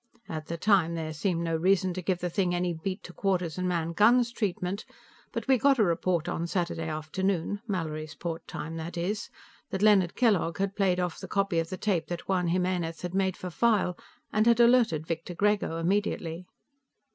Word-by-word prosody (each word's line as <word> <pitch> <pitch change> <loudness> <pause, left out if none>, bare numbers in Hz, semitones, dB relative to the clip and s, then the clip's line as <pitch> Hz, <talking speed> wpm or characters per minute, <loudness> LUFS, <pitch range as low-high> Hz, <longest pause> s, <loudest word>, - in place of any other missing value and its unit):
At 155 -1 -5
the 170 - -4
time, 175 -3 +3
there 160 -1 -4
seemed 170 +1 -1
no 165 -1 0
reason 185 +2 +2
to 185 - -4
give 180 0 -1
the 180 - -1
thing 180 -1 +1
any 175 0 0
beat 185 +5 -4
to 180 - -10
quarters 180 -4 -1
and 180 0 0
man 170 -1 -1
guns 235 +5 +4
treatment, 200 -3 -2 0.5
but - - -4
we 265 -2 +4
got 275 +3 +4
a 220 - +4
report 170 -2 +1
on 170 - -2
Saturday 170 -2 -2
afternoon 175 +5 -2
Mallorysport 160 -2 -4
time, 165 +1 -5
that 170 +2 -6
is 195 +5 -2 0.4
that 190 +1 -2
Leonard 195 -5 +5
Kellogg 200 -9 +2
had 195 0 -1
played 185 -3 +2
off 180 -2 -2
the - - -7
copy 195 -4 +1
of 165 0 -2
the 185 - -4
tape 180 -7 0
that 175 -1 -5
Juan 180 -2 +1
Jimenez 180 -1 -1
had 180 0 -4
made 190 -1 +1
for 180 - -6
file, 210 -3 +2 0.4
and 215 +2 +3
had 235 0 +5
alerted 235 -10 +4
Victor 165 +2 -4
Grego 205 -4 +1
immediately. 175 -1 -1
180 Hz, 190 wpm, -28 LUFS, 165-200 Hz, 0.5 s, Leonard